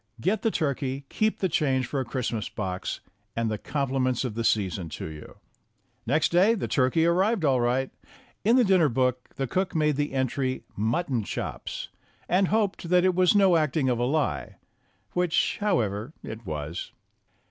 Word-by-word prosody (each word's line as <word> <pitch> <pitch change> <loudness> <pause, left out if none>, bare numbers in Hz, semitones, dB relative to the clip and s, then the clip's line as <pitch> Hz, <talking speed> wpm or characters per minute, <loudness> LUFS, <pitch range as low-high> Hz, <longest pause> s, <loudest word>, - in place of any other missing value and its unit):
Get 195 - 0
the 225 - +2
turkey, 140 - -2
keep 215 0 0
the 190 - +3
change 135 -6 +1
for 135 +3 -3
a 130 - -2
Christmas 115 -2 -3
box, 95 -3 -4 0.3
and 115 -1 0
the 105 - -3
compliments 135 -3 -1
of 120 - -3
the 115 +2 -2
season 95 -6 0
to - - -5
you." 75 -1 -9 0.7
Next 150 +6 +2
day 190 +7 +5
the 200 - -3
turkey 135 +5 +2
arrived 185 +2 +2
all 130 -3 +3
right. 125 +2 +1 0.5
In 230 +4 +4
the 255 - +5
dinner 185 -7 +4
book 125 0 0
the 135 - -1
cook 185 +7 -1
made 150 -3 +2
the 145 -1 -1
entry 130 0 -1
"Muton 120 - 0
chopes," - - -5 0.4
and 185 +2 +3
hoped 200 -4 0
that 180 0 +4
it 185 - +4
was 185 +2 +4
no 195 -3 +5
acting 150 -3 +1
of 120 -2 0
a 120 - +1
lie 130 - -1 0.6
which, 180 -2 +1
however, 120 - 0
it 110 -1 -8
was. 75 +2 -4
135 Hz, 170 wpm, -26 LUFS, 120-180 Hz, 0.7 s, day